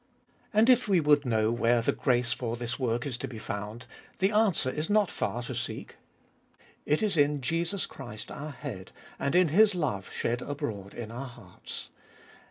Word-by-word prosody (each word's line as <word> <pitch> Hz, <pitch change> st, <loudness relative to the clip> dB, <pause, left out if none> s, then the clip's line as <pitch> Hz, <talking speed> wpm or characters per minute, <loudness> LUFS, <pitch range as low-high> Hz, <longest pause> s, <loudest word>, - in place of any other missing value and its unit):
And 215 Hz, +2 st, +4 dB
if 250 Hz, -2 st, +5 dB
we 190 Hz, -4 st, +4 dB
would 145 Hz, -3 st, +4 dB
know 110 Hz, -1 st, +2 dB
where 120 Hz, 0 st, +2 dB
the -, -, +3 dB
grace 120 Hz, -2 st, +1 dB
for 120 Hz, -2 st, -3 dB
this 120 Hz, +2 st, -2 dB
work 120 Hz, -1 st, 0 dB
is 130 Hz, -4 st, -2 dB
to -, -, -4 dB
be 115 Hz, -, -8 dB
found, 105 Hz, +2 st, -5 dB, 0.3 s
the 195 Hz, +2 st, +2 dB
answer 210 Hz, -11 st, +3 dB
is 155 Hz, +3 st, -3 dB
not 205 Hz, -3 st, +3 dB
far 120 Hz, -, -2 dB
to -, -, -5 dB
seek. -, -, -4 dB, 0.9 s
It 150 Hz, +7 st, +2 dB
is 205 Hz, -5 st, +1 dB
in 145 Hz, 0 st, +3 dB
Jesus 170 Hz, +8 st, 0 dB
Christ 110 Hz, -6 st, -8 dB
our 150 Hz, +2 st, -6 dB
Head 125 Hz, -9 st, -7 dB, 0.3 s
and 140 Hz, -, 0 dB
in 180 Hz, -2 st, +5 dB
His 205 Hz, +5 st, +5 dB
love 125 Hz, -, -2 dB
shed 120 Hz, +1 st, -1 dB
abroad 115 Hz, -10 st, -5 dB
in 115 Hz, -2 st, -6 dB
our 130 Hz, +4 st, -5 dB
hearts. 120 Hz, -, -9 dB
130 Hz, 180 wpm, -29 LUFS, 115-165 Hz, 0.9 s, if